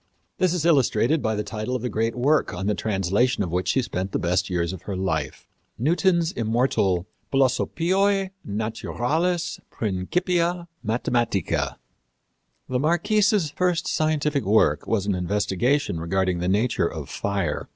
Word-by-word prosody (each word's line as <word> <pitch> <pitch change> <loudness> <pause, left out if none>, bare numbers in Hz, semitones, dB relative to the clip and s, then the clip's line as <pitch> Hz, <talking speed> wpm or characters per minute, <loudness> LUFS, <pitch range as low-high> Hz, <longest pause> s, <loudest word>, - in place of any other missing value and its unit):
This 180 -1 +2
is 165 -2 -1
illustrated 140 -2 +3
by 110 0 0
the 105 - -2
title 110 +4 -4
of 125 - -3
the - - 0
great 115 0 -1
work 140 -2 +2
on 90 +2 -4
the 105 - +2
translation 100 +4 +1
of 90 - -4
which 90 +1 -1
she 130 - +2
spent 95 -4 -4
the - - +2
best 90 +3 0
years 85 -1 -1
of 95 - -8
her 100 - -2
life 80 -6 -2 0.3
Newton's 170 - +2
immortal 110 - +1 0.3
Philosophiæ 185 +9 +2
Naturalis 145 - -1
Principia 170 - -1 0.2
Mathematica. 115 -3 0 0.9
The 125 -1 -1
Marquise's 195 - +2
first 180 +1 0
scientific 150 -2 +1
work 95 -8 +2
was 105 -4 0
an 100 - +1
investigation 100 - 0
regarding 90 +1 0
the 90 - -1
nature 105 -1 +1
of 75 -4 -6
fire. 100 -7 -2
115 Hz, 140 wpm, -24 LUFS, 95-160 Hz, 0.9 s, illustrated